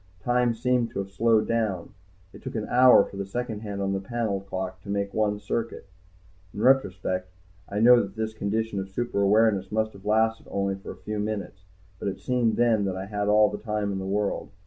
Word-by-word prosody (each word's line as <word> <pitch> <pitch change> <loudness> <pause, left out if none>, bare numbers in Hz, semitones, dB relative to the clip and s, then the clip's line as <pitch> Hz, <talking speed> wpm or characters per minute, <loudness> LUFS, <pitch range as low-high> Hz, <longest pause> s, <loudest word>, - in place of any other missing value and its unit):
Time 120 -1 +2
seemed 125 0 +1
to - - -9
have 100 0 -4
slowed 110 +2 +2
down, 110 -6 -1 0.4
it - - -12
took - - -7
an 110 -1 -3
hour 125 -4 +7
for 100 - -10
the 100 - -3
second 115 0 -4
hand 100 -2 -6
on 95 0 0
the 95 - -1
panel 105 -1 -2
clock 95 -1 -5
to 100 - -12
make 100 0 -2
one 105 -1 0
circuit. 115 +3 -4 0.7
In 105 - -4
retrospect 95 -7 +2 0.4
I 105 +1 -2
know 120 +1 +7
that 100 +1 -6
this 110 0 -3
condition 110 0 -2
of 95 0 -5
super 100 0 -2
awareness 100 -1 +3
must 110 0 0
have 100 - -14
lasted 110 +1 +1
only 100 0 -1
for 95 0 -9
a - - -6
few 105 0 -3
minutes. 100 -3 -4 0.3
But - - -4
it 95 -1 -3
seemed 125 -3 +1
then 115 -3 +3
that 95 -1 -2
I 95 - -4
had 105 0 -3
all 105 0 +5
the - - -5
time 105 -2 -2
in 95 - -3
the 95 - -5
world. 100 +1 -1
105 Hz, 215 wpm, -26 LUFS, 100-115 Hz, 0.7 s, hour